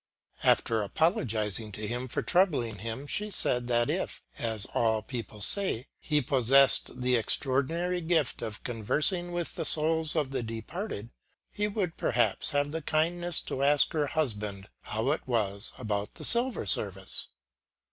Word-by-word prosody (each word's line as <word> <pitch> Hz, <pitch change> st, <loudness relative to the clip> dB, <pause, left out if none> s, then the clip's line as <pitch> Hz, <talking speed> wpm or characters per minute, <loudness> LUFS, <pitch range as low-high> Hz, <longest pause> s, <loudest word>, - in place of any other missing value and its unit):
After 110 Hz, -1 st, +2 dB
apologizing 110 Hz, -, 0 dB
to 105 Hz, +2 st, -5 dB
him 120 Hz, +3 st, -4 dB
for -, -, -3 dB
troubling 145 Hz, -, +1 dB
him, 115 Hz, +6 st, -6 dB
she 210 Hz, +8 st, -2 dB
said 125 Hz, -10 st, +1 dB
that 120 Hz, -1 st, +2 dB
if, -, -, -3 dB, 0.2 s
as 110 Hz, -3 st, -1 dB
all 110 Hz, -2 st, +1 dB
people 115 Hz, -4 st, -7 dB
say, 160 Hz, -, +2 dB
he 150 Hz, -3 st, 0 dB
possessed 135 Hz, -1 st, +3 dB
the 125 Hz, 0 st, +2 dB
extraordinary 145 Hz, +9 st, 0 dB
gift 160 Hz, -5 st, 0 dB
of 110 Hz, -1 st, -6 dB
conversing 150 Hz, -, 0 dB
with 175 Hz, -1 st, -4 dB
the -, -, -4 dB
souls 160 Hz, 0 st, +1 dB
of 145 Hz, -4 st, -1 dB
the 130 Hz, -2 st, -2 dB
departed, 115 Hz, -, -6 dB, 0.4 s
he 210 Hz, 0 st, -2 dB
would 200 Hz, -5 st, -3 dB
perhaps 120 Hz, +1 st, +1 dB
have 145 Hz, -1 st, -1 dB
the 160 Hz, +1 st, -4 dB
kindness 170 Hz, +3 st, -1 dB
to 135 Hz, -, -5 dB
ask 145 Hz, +1 st, +3 dB
her 150 Hz, -2 st, 0 dB
husband 105 Hz, -9 st, -3 dB
how 110 Hz, +6 st, -2 dB
it 155 Hz, -, -4 dB
was 105 Hz, -4 st, -2 dB
about 105 Hz, -4 st, -3 dB
the -, -, -3 dB
silver 240 Hz, -, +7 dB
service. 95 Hz, -1 st, +1 dB
130 Hz, 150 wpm, -28 LUFS, 110-160 Hz, 0.4 s, silver